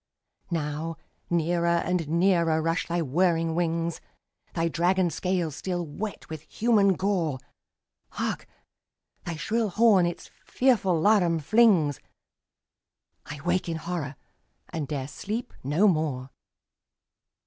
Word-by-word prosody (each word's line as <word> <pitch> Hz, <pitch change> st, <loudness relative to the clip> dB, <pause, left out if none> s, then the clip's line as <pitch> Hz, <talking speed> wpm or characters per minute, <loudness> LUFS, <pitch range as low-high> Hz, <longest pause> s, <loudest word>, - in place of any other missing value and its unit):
Now 160 Hz, -1 st, -3 dB, 0.3 s
near 170 Hz, 0 st, +1 dB
and 170 Hz, -1 st, 0 dB
nearer 170 Hz, -2 st, +3 dB
rush 165 Hz, +2 st, -1 dB
thy 170 Hz, 0 st, 0 dB
whirring 165 Hz, +2 st, +1 dB
wings, 165 Hz, 0 st, -1 dB, 0.5 s
Thy 165 Hz, 0 st, +1 dB
dragon 175 Hz, +2 st, +1 dB
scales 175 Hz, -2 st, -1 dB
still 175 Hz, -1 st, -3 dB
wet 195 Hz, +8 st, -6 dB
with 160 Hz, -2 st, -7 dB
human 205 Hz, +2 st, +2 dB
gore. 180 Hz, -8 st, 0 dB, 0.8 s
Hark, -, -, -3 dB, 0.8 s
thy 170 Hz, -, -3 dB
shrill 220 Hz, +7 st, -1 dB
horn 200 Hz, -3 st, +4 dB
its 175 Hz, -, -6 dB
fearful 215 Hz, -10 st, +2 dB
laram 175 Hz, -3 st, +3 dB
flings! 175 Hz, -, +4 dB, 1.3 s
—I 145 Hz, -1 st, -7 dB
wake 180 Hz, 0 st, 0 dB
in 165 Hz, -, -2 dB
horror, 160 Hz, -4 st, -4 dB, 0.5 s
and 155 Hz, -4 st, -4 dB
'dare 140 Hz, -3 st, -3 dB
sleep 215 Hz, +10 st, -5 dB
no 155 Hz, +10 st, +3 dB
more! 150 Hz, -7 st, 0 dB
170 Hz, 115 wpm, -26 LUFS, 160-185 Hz, 1.3 s, horn